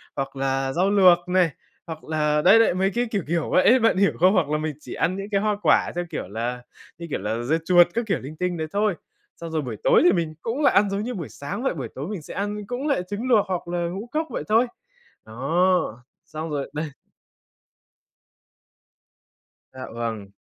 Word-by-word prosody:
hoặc 135 0 -4
là 135 0 -1
rau 185 +3 +2
luộc 180 -3 +5
này, 180 -2 +3 0.4
hoặc 160 -1 -7
là 150 -1 0
đấy 195 +7 +7
đấy, 225 - +4
mấy 190 +2 +1
cái 245 - +1
kiểu 200 -6 -1
kiểu 165 0 -1
vậy 185 - +4
ấy, 255 +2 +6
bạn 225 -4 +3
hiểu 200 +1 +4
không? 185 +3 +5
Hoặc 165 -8 +2
là 150 - +1
mình 155 -1 -3
chỉ - - -9
ăn 175 +3 0
những 200 +1 -6
cái 195 - +2
hoa 210 0 +1
quả, - - +3
theo 175 - -2
kiểu - - -5
là, 120 +5 -4 0.4
như 170 0 -7
kiểu - - -2
là, 110 +3 -2
dưa 155 +6 +1
chuột 175 -1 +6
các 235 +1 -1
kiểu 195 - 0
linh 145 +4 -9
tinh 180 -1 -2
đấy 155 0 -3
thôi. 205 -2 +1 0.4
Xong 165 -1 -8
rồi 160 - 0
buổi 125 -6 -5
tối - - +5
thì 355 - +6
mình 165 -3 -1
cũng 235 +6 -3
lại 285 - +4
ăn 205 0 +4
giống 195 +1 -2
như 250 +1 -4
buổi 170 -7 -6
sáng 200 - -6
vậy, 265 - +1
buổi 140 -6 -5
tối 140 +5 -5
mình 200 -6 -5
sẽ - - -10
ăn 205 +1 -3
cũng 255 +5 -3
lại 280 -10 +1
trứng 210 +5 -4
luộc 220 -5 +4
hoặc 180 -2 -3
là 175 - -3
ngũ 195 +7 -6
cốc 315 +1 -1
vậy - - -4
thôi. 230 +3 +4 0.6
Đó, 135 +1 0 0.2
xong 155 +1 -6
rồi 145 -2 -4
đây 150 0 -4 2.8
Dạ 130 - -8
vầng. 110 -4 -4
175 Hz, 225 wpm, -24 LUFS, 150-205 Hz, 2.8 s, đấy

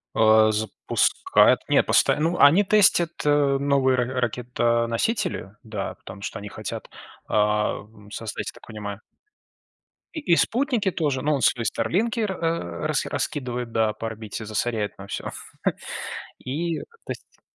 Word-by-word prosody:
А, 110 0 +6
запускает 110 0 +2
не - - +5
постоя - - +3
ну 165 +3 +1
они 160 +8 +7
тестят, 190 -4 +4 0.2
э, 145 -2 +3
новые 135 -2 +2
ра 125 +1 -1
ракетоносители, 120 - 0
да, 105 -4 -4
потому 95 +1 -11
что 100 - -5
они 100 +1 -7
хотят, - - -6 0.4
ам, 105 0 -1
создать, 110 0 -5
я - - -7
так - - -17
понимаю 105 -2 -6 1.1
И 315 - -3
и - - +7
спутники 235 - +1
тоже. 145 -6 -1
Ну 150 +1 +2
он 140 - 0
свои 120 -1 +2
"Старлинки", 230 - 0
э, 215 - +1
рас 165 - -1
раскидывает, 125 -4 -3
да, 110 -1 +1
по 115 - -5
орбите, 110 -1 -6
засоряет 110 0 -2
нам 100 - -10
всё. - - -4 1.1
И 160 +5 -2
то - - -7 0.3
есть. - - -9
120 Hz, 140 wpm, -24 LUFS, 110-160 Hz, 1.1 s, они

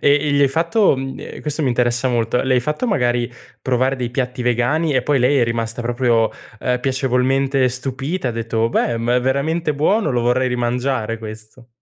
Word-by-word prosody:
e 145 0 0
gli 145 - +3
hai 140 - +6
fatto 170 - +2
mhmm, 135 0 -5
ehm, - - -9
questo 150 +1 -3
mi 140 - +1
interessa 120 +1 +1
molto, 120 0 0
le 130 -1 +1
hai - - +4
fatto 150 - -2
magari 120 - 0 0.3
provare 130 +1 +1
dei 125 -2 -3
piatti 125 0 -3
vegani 125 +6 +1
e 130 - +2
poi 140 0 +1
lei 135 +3 +3
è 120 - +4
rimasta 115 0 -2
proprio, 120 -2 +1 0.3
ehm, 125 -1 0
piacevolmente 135 +1 +1
stupita, 135 +6 -3
e - - 0
ha - - -9
detto: 115 0 -1
"Beh, 115 0 0
ma 120 +2 0
è 125 - +2
veramente 150 +5 0
buono, 155 +3 +1
lo 120 -1 0
vorrei 125 +2 +2
rimangiare 120 -1 -1
questo." 110 +2 -11
125 Hz, 200 wpm, -19 LUFS, 120-140 Hz, 0.3 s, hai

